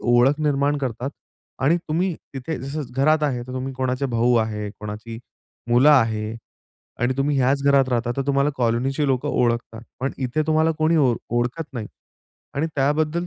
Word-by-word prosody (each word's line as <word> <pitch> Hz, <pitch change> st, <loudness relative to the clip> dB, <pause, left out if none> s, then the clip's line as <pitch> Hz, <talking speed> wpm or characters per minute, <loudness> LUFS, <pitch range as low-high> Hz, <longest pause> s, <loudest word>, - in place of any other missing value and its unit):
ओळख 125 Hz, +5 st, +3 dB
निर्माण 145 Hz, -1 st, +1 dB
करतात. 130 Hz, 0 st, -3 dB, 0.5 s
आणि 150 Hz, +6 st, +3 dB
तुम्ही 175 Hz, +3 st, 0 dB, 0.2 s
तिथे 135 Hz, +5 st, -4 dB
जसं 140 Hz, +4 st, -4 dB
घरात 155 Hz, +3 st, +3 dB
आहे 130 Hz, -5 st, 0 dB
तर 125 Hz, +1 st, -9 dB
तुम्ही 130 Hz, +1 st, -4 dB
कोणाचे 130 Hz, +1 st, -1 dB
भाऊ 120 Hz, 0 st, +2 dB
आहे, 105 Hz, -2 st, -1 dB
कोणाची 110 Hz, +2 st, -7 dB, 0.5 s
मुलं 125 Hz, +5 st, +6 dB
आहे 110 Hz, -4 st, +2 dB, 0.6 s
आणि 125 Hz, +1 st, +2 dB
तुम्ही 140 Hz, +1 st, +1 dB
ह्याच 135 Hz, +2 st, +2 dB
घरात 140 Hz, -2 st, +4 dB
राहता. 120 Hz, -1 st, 0 dB
तर 135 Hz, -, 0 dB
तुम्हाला 140 Hz, +1 st, +2 dB
कॉलनीची 130 Hz, +5 st, 0 dB
लोकं 130 Hz, -2 st, 0 dB
ओळखतात. 115 Hz, -1 st, 0 dB, 0.2 s
पण 135 Hz, +2 st, -1 dB
इथे 130 Hz, +4 st, 0 dB
तुम्हाला 160 Hz, +1 st, +3 dB
कोणी 160 Hz, +1 st, +3 dB
ओळ 130 Hz, -6 st, +3 dB, 0.2 s
ओळखत 125 Hz, +7 st, -1 dB
नाही. 110 Hz, -3 st, -4 dB, 0.7 s
आणि 145 Hz, +3 st, 0 dB
त्याबद्दल 155 Hz, +5 st, +1 dB
135 Hz, 165 wpm, -23 LUFS, 120-145 Hz, 0.7 s, मुलं